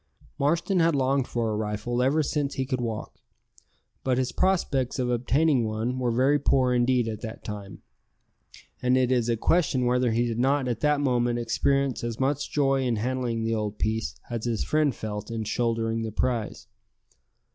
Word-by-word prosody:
Marston 170 +6 +1
had 165 -2 +3
longed 135 -1 +1
for 115 -2 -1
a - - -1
rifle 105 +3 -2
ever 145 +5 +2
since 145 -1 -1
he 130 - -1
could 130 -2 -2
walk; 115 -2 -5 0.8
but 130 -2 +1
his 130 -1 0
prospects 140 -8 0
of 125 -1 0
obtaining 130 +3 +2
one 110 +4 -2
were 125 -1 0
very 130 +5 +3
poor 130 -2 +2
indeed 125 -1 +2
at 110 -1 -5
that 110 0 -7
time, 100 -2 -8 1.0
and 125 0 +3
it 130 -1 +2
is 120 -2 +2
a 115 - +1
question 140 -2 +2
whether 125 0 +2
he 115 +2 +1
did 115 -1 -2
not 135 +1 +2
at 120 - -2
that 150 -1 +2
moment 120 -3 +1
experience 135 +3 0
as 115 -1 -4
much 140 +1 0
joy 135 -2 +2
in 125 -3 0
handling 120 0 -2
the 115 0 0
old 105 -1 -2
piece 110 - -1
as 115 -1 -4
his 115 -3 -1
friend 150 -4 +1
felt 105 0 -5
in 115 -1 -3
shouldering 115 0 -1
the 110 -1 -3
prize. 115 0 -2
125 Hz, 180 wpm, -26 LUFS, 115-135 Hz, 1.0 s, had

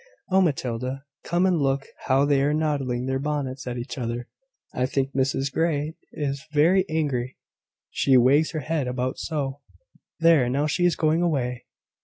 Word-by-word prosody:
Oh, 190 +1 +5
Matilda, 130 -4 -1 0.2
come 175 +2 +1
and 180 -5 +2
look 135 0 +1 0.2
how 135 +1 +4
they 140 -1 +3
are 145 +2 +2
nodding 135 -6 -1
their 130 0 -1
bonnets 140 -2 -3
at 125 0 -3
each 120 +3 -6
other! 120 0 -3 0.5
I 125 0 0
think 135 0 -1
Mrs 135 0 0
Grey 155 -2 0 0.2
is 140 -2 -3
very 180 +6 +4
angry, 135 -5 -1 0.5
she 135 -2 +3
wags 140 +6 +4
her 155 - -2
head 150 -1 -1
about 125 +1 -2
so. 140 -4 -3 0.6
There! 165 -7 +5
now 140 +4 +1
she 175 +4 +1
is 175 - +1
going 160 +1 +2
away. 125 -8 -1
140 Hz, 165 wpm, -25 LUFS, 130-155 Hz, 0.6 s, Oh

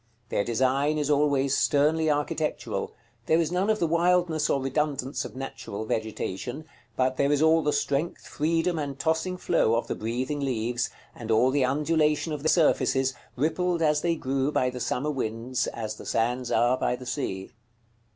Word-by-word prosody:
Their 100 - +1
design 135 +6 +1
is 150 -1 0
always 140 -2 +2
sternly 155 +2 +2
architectural; 150 +1 -1 0.4
there 160 - +4
is 165 -1 0
none 185 +4 +1
of 215 - +3
the 175 - +1
wildness 170 -1 +2
or 140 - +2
redundance 135 0 -1
of - - -9
natural 110 -5 -6
vegetation, 110 +5 -3 0.3
but 130 0 +1
there 140 +1 +2
is 145 - +3
all 160 +1 +4
the 150 -1 +1
strength, 145 +3 -1
freedom, 165 +2 0
and 140 -2 -4
tossing 160 +5 0
flow 115 -9 +2
of 115 - 0
the - - -3
breathing 125 +6 -3
leaves, 120 -3 -1 0.2
and 115 -2 -9
all 115 +4 +4
the 140 -1 +2
undulation 150 +3 +1
of 150 - -4
their 155 - +1
surfaces, 135 -5 +3 0.2
rippled, 165 +5 0
as 150 -1 +3
they 170 -1 +1
grew, 135 -1 -1
by 125 -3 +1
the 125 - -6
summer 125 +5 -1
winds, 120 -1 -2
as 110 -2 -5
the - - -10
sands 120 +2 0
are 125 +2 +3
by - - +1
the 125 +1 -10
sea. 120 -7 -4
140 Hz, 175 wpm, -27 LUFS, 125-155 Hz, 0.4 s, there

